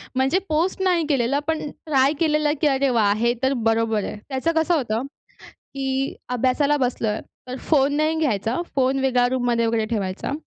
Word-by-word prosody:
म्हणजे 270 +8 +2
पोस्ट 335 +5 0
नाही 350 -4 +2
केलेला, 275 -1 +1
पण 320 -1 0
ट्राय 280 -2 +1
केलेलं, 300 -2 +2
की 300 - +4
अरे 270 -1 +2
वा! 215 -4 +3
हे 235 +1 +2
तर 265 +1 +3
बरोबर 225 -2 +1
आहे. - - -5
त्याचं 270 +5 0
कसं 320 +2 +2
होतं, 235 -4 -1 0.7
की 270 0 -2 0.2
अभ्यासाला 280 +4 +2
बसलोय, 240 -5 -1 0.3
तर 255 - -4
फोन 285 -2 +3
नाही 310 +1 +1
घ्यायचा, 235 - 0 0.2
फोन 265 +1 +2
वेगळा 250 -2 +2
रूममध्ये 245 -2 0
वगैरे 225 -1 0
ठेवायचा. 205 +1 -3
265 Hz, 165 wpm, -22 LUFS, 235-300 Hz, 0.7 s, की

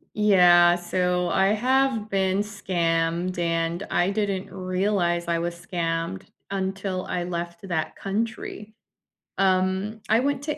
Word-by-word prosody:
Yeah, 180 -4 +6
so 180 0 0
I 190 0 +3
have 255 -1 +1
been 190 -1 +1
scammed 175 -4 -1
and 165 +1 -1
I 175 +2 +2
didn't 200 -2 -2
realize 185 -2 0
I 170 -1 +1
was 170 +1 -3
scammed 165 - -3 0.3
until 190 -1 -3
I 180 - -2
left 170 +1 -5
that 165 -4 -2
country. 210 +1 -4 0.7
Um, 190 +3 +1
I 220 +2 +5
went 280 +1 -1
to 300 0 -3
185 Hz, 125 wpm, -25 LUFS, 175-205 Hz, 0.7 s, Yeah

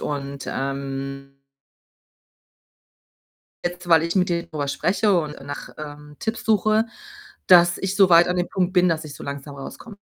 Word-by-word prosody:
und, 140 -1 -5
ähm 135 0 -5 2.2
Jetzt, 175 0 -4
weil 165 -1 +6
ich 170 +3 -2
mit 185 -1 +2
denen 170 0 -2
drüber 145 -3 -3
spreche 195 +6 +1
und 150 -3 -6
nach, 145 +1 -7
ähm, 150 -1 -9
Tipps 225 0 -3
suche, 215 +1 +3 0.6
dass 175 -1 +6
ich 190 0 -2
so 195 -2 +5
weit 170 0 +7
an 180 - 0
dem 175 - 0
Punkt 185 -1 -1
bin, 180 -1 +4
dass 160 -1 -1
ich 145 - -9
so - - -10
langsam 140 0 -7
rauskomme. 200 - -9
165 Hz, 160 wpm, -23 LUFS, 140-180 Hz, 2.2 s, weit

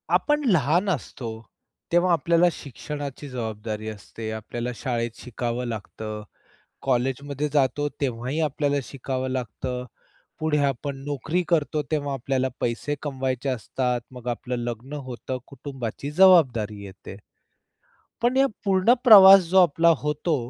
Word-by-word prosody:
आपण 295 0 +1
लहान 175 - +2
असतो 130 -7 -3 0.6
तेव्हा 175 +1 +3
आपल्याला 170 +2 +3
शिक्षणाची 145 0 -7
जबाबदारी 110 -3 -5
असते. 110 +1 -8
आपल्याला 115 +2 -5
शाळेत 115 0 -2
शिकावं 120 0 -3
लागतं. 110 -1 -6 0.6
कॉलेजमध्ये 135 +3 -1
जातो 145 0 +1
तेव्हाही 130 +2 -2
आपल्याला 145 -1 0
शिकावं 130 -1 -4
लागतं. 125 0 -4 0.6
पुढे 155 -1 +1
आपण 140 +1 -2
नोकरी 145 +5 -1
करतो 155 -2 +1
तेव्हा 145 -2 -1
आपल्याला 130 0 -1
पैसे 120 +5 -1
कमवायचे 130 -2 -2
असतात. 125 0 -1
मग 125 -1 -11
आपलं 125 +1 -3
लग्न 120 +3 -6
होतं. 130 +1 -5
कुटुंबाची 135 -1 -6
जबाबदारी 135 - +4
येते. 95 0 -10 1.1
पण 245 +2 +2
या 275 0 +5 0.2
पूर्ण 195 +4 +4
प्रवास 195 -5 +10
जो 190 +2 +5
आपला 170 0 +4
होतो, 150 +2 -1
135 Hz, 120 wpm, -24 LUFS, 120-155 Hz, 1.1 s, प्रवास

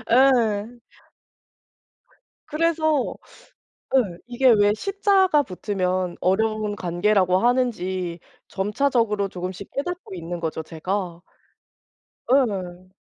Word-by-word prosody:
어 260 - +7 0.5
예. 240 -1 -19 1.7
그래서 315 -2 +1 0.8
예 190 -9 +1
이게 250 +2 +2
왜 205 -2 +5
시 395 - -6
자가 380 -7 +4
붙으면 185 -3 -2
어려운 215 +2 0
관계라고 185 +1 +2
하는지 190 -8 0 0.3
점차적으로 210 0 0
조금씩 185 +1 -7
깨닫고 355 - -4
있는 170 0 -6
거죠, 160 -1 -3
제가. 175 +2 -4 1.1
예. 185 -8 0
205 Hz, 195 characters per minute, -23 LUFS, 180-255 Hz, 1.7 s, 어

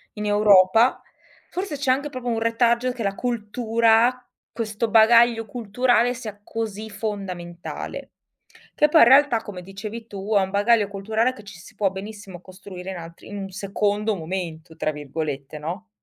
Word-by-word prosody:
in 210 0 -4
Europa, 205 +2 +5 0.5
forse 360 -5 -4
c'è 270 -2 +1
anche 285 +3 0
proprio 255 -3 -7
un 230 -1 0
retaggio 235 +2 +2
che 235 -3 -5
la 195 0 -1
cultura, 235 +1 +1 0.2
questo 225 0 -3
bagaglio 230 +1 +5
culturale, 245 +2 +1
sia 215 -4 -8
così 220 -1 -5
fondamentale. 190 -5 -6 0.7
Che 300 - +4
poi 320 +1 +6
in - - +8
realtà 265 -3 +5
come 190 -3 -8
dicevi 210 +5 -8
tu 205 0 -5
è 200 - +5
un 190 - -1
bagaglio 205 +1 +3
culturale 220 +5 -1
che 210 - -13
ci 200 -4 -12
si - - -15
può 200 -2 +1
benissimo 195 -2 -9
costruire 185 0 -9
in 185 - -6
altri 170 0 -11
"in 205 - -8
un 195 -1 -5
secondo 205 +2 -1
momento" 165 -2 -6
tra 155 - 0
virgolette, 145 -1 -5
no, 180 +9 -6
210 Hz, 160 wpm, -23 LUFS, 190-235 Hz, 0.7 s, in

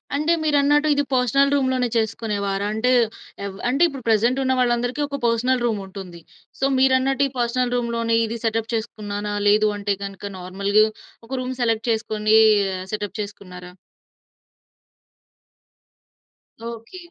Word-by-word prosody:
అంటే 305 +4 +2
మీరన్నట్టు 295 0 +3
ఇది 285 0 +1
పర్సనల్ 260 +3 +3
రూమ్‌లోనే 260 -2 +1
చేసుకునేవారంటే 215 0 -1 0.5
ఏవ 200 - -4 0.2
అంటే 275 +6 0
ఇప్పుడు 270 -5 -8
ప్రెజెంటున్న 255 +5 +2
వాళ్ళందరికి 245 +3 0
ఒక 280 0 -4
పర్సనల్ 240 +2 +1
రూముంటుంది. 195 -5 -5 0.4
సో, 270 - +1
మీరు 260 0 +4
అన్నట్టు 270 +1 +1
ఈ - - -11
పర్సనల్ 245 +1 0
రూమ్‌లోని 235 -1 0
ఇది 230 +1 -4
సెటప్ 225 +1 -1
చేసుకున్నాన 210 -2 -4 0.2
లేదు 210 +1 +4
అంటే 200 -1 -1
గనుక 195 0 -8 0.2
నార్మల్‌గా 200 +4 +2 0.4
ఒక - - -19
రూమ్ 255 +1 -4
సెలెక్ట్ 230 0 0
చేసుకొనీ 220 -1 +1 0.6
సెటప్ 205 +1 -4
చేసుకున్నారా? 180 -3 -9 2.9
ఓకే. 230 +8 -8
230 Hz, 120 wpm, -22 LUFS, 210-260 Hz, 2.9 s, మీరు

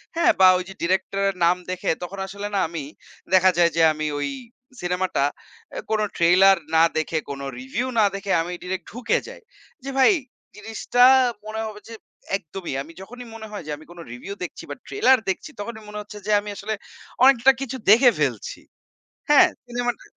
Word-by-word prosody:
হ্যাঁ? 335 - +4
বা 185 - +8
ওই 180 - -3
যে - - -8
ডিরেক্টর 190 +3 0
এর 195 - -4
নাম 180 +1 +3
দেখে 185 - -3
তখন 195 +3 -7
আসলে 200 +1 -6
না - - +2
আমি 165 -3 -5 0.5
দেখা 185 0 +6
যায় 170 -1 +4
যে 165 - +2
আমি 155 0 -3
ওই 145 - -2 0.5
সিনেমাটা 180 -3 -1 0.5
এ - - -2
কোন 220 -1 +1 0.2
ট্রেইলার 185 +3 +6 0.2
না 160 - +6
দেখে 160 0 -1
কোন 140 -1 -5 0.2
রিভিউ 135 - -3
না 210 - +5
দেখে 195 -1 -4
আমি 175 +2 -5
ডিরেক্ট 185 +1 -4
ঢুকে 245 +3 0
যাই। - - -11 0.4
যে 275 - -5
ভাই 265 +9 +6 0.4
জিনিসটা 225 +3 0 0.4
মনে 220 +1 -4
হবে 210 -1 -9
যে - - -8 0.4
একদমই 180 -3 -7
আমি 155 - -10
যখনই 245 +5 -10
মনে 220 -1 -8
হয় 205 -5 -6
যে - - -4
আমি 155 - -15
কোন 175 - -13
রিভিউ 160 +11 -7
দেখছি 180 - -7
বা - - -5
ট্রেইলার 335 -11 +4
দেখছি 190 - -3
তখনই 220 +1 -6
মনে 210 0 -7
হচ্ছে 210 0 -11
যে 215 - 0
আমি 205 0 -7
আসলে 215 +2 -4 0.5
অনেকটা 265 0 +6
কিছু 265 -1 -4
দেখে 245 +3 +7
ফেলছি। - - -2 0.7
হ্যাঁ 295 - +7 0.2
সিনেমাটা 245 0 -3
200 Hz, 185 wpm, -23 LUFS, 175-235 Hz, 0.7 s, বা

